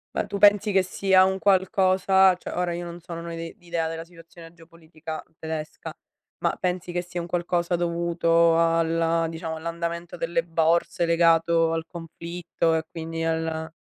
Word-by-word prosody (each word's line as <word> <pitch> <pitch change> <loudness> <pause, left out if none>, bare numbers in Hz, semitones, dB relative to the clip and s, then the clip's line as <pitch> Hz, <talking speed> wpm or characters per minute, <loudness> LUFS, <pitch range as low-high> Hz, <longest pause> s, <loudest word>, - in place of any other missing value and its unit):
Ma - - -1
tu 200 - -4
pensi 205 +1 +5
che 190 -1 +3
sia 185 0 +3
un 190 0 -1
qualcosa 190 0 +3
cioè, 180 - -8
ora, 180 0 -1
io 175 0 -5
non 170 0 -8
so, 170 0 -8
non 170 0 -7
ho 170 - -6
ide 165 0 -7
idea 170 -2 -2
della 165 0 -5
situazione 165 -1 -15
geopolitica 165 -1 -10 0.2
tedesca, 160 -1 -6 0.5
ma - - +1
pensi 180 -1 -3
che 175 0 -1
sia 175 0 -6
un 170 - -4
qualcosa 175 0 -1
dovuto 170 -1 +2
alla 165 0 +2
diciamo 160 0 -5
all'andamento 170 +1 -5
delle 165 0 -1
borse, 170 +2 +1
legato 165 0 +3
al 165 0 -2
conflitto 170 0 -3
e 160 - 0
quindi 165 0 -5
alla 160 0 -2
170 Hz, 165 wpm, -25 LUFS, 165-175 Hz, 0.5 s, pensi